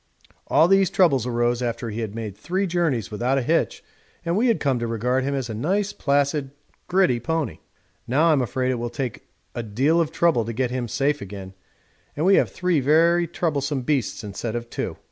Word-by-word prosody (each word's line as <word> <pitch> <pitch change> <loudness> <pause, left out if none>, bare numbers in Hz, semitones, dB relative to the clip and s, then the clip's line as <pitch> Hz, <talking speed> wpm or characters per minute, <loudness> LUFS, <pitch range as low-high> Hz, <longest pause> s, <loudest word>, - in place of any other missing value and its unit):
All 160 - +5
these 195 -1 +4
troubles 150 - +3
arose 120 0 0
after 115 -1 -3
he 110 - -5
had 110 -2 -4
made 110 -4 -5
three 185 - -2
journeys 165 - 0
without 125 +5 0
a 135 - 0
hitch 165 +7 0 0.4
and 170 +1 0
we 230 +5 +2
had 230 - +2
come 135 -4 +1
to 120 - -2
regard 125 +3 0
him 140 +1 -1
as 135 -3 -2
a 115 - -5
nice, 190 - -1
placid, 140 0 0 0.4
gritty 180 -10 +3
pony. 150 - -2 0.5
Now 155 +7 +3
I'm 145 -4 +3
afraid 130 +1 -1
it 125 - -2
will 120 0 -3
take 125 0 -5 0.3
a 120 - -3
deal 135 +10 +2
of 160 -1 -1
trouble 165 -8 +2
to 115 - -4
get 125 +1 -1
him 125 -1 -2
safe 145 +5 0
again, 95 -1 -8 0.6
and 155 - 0
we 195 - +5
have - - +3
three 180 -3 0
very 165 +5 +3
troublesome 145 -5 -1
beasts 130 -6 -1
instead 110 +3 -4
of 120 0 -5
two. - - -4
135 Hz, 200 wpm, -23 LUFS, 120-165 Hz, 0.6 s, All